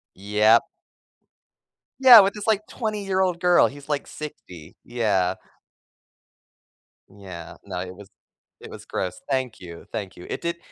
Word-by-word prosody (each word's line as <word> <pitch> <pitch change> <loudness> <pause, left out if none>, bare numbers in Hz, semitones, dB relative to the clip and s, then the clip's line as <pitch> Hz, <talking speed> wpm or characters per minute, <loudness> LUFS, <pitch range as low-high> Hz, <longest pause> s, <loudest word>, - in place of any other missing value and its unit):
Yep. 105 +4 +3 1.4
Yeah, 255 -4 +10
with 195 0 +1
this, 210 0 -8
like, 215 -1 +1
twenty-year-old 195 -5 -2
girl, 180 0 +4
he's 140 0 -12
like, 145 -2 -2
60, 90 - -10
yeah. 105 -7 0 1.7
Yeah, 95 -4 -11
no, - - -5
it 90 0 -7
was 100 0 -14 0.5
it - - -11
was - - -11
gross. 90 - -4
Thank 130 -4 -2
you, 85 -2 -11
thank 100 -5 -5
you. 90 - -12
It - - -4
did 170 0 -3
120 Hz, 135 wpm, -23 LUFS, -, 1.7 s, Yeah